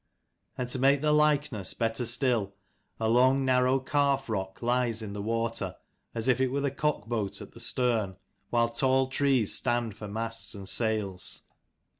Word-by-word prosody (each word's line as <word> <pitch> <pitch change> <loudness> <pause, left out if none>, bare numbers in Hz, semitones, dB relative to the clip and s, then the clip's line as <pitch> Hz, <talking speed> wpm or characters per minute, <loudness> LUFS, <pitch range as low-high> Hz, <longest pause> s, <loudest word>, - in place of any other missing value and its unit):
And 125 - -2
to 130 - 0
make 135 +1 +4
the 150 0 +2
likeness 150 -9 +1
better 115 +1 -1
still, 120 -5 +1 0.4
a 110 - 0
long 130 +4 +4
narrow 130 +1 +3
calf 140 -1 0
rock 95 -1 -4
lies 120 -2 0
in 100 -2 -6
the 100 - -5
water, 115 +2 -2 0.4
as 115 +1 -2
if 130 0 +3
it 130 - +3
were 140 +2 -2
the 140 -1 0
cockboat 120 -8 -2
at - - -10
the - - -14
stern; 115 -7 +1 0.3
while 115 -1 +2
tall 130 +2 +2
trees 135 -5 +2
stand 120 -4 0
for 105 - -8
masts 115 +2 -4
and 100 -1 -8
sails. 105 -4 0
120 Hz, 165 wpm, -28 LUFS, 110-130 Hz, 0.4 s, make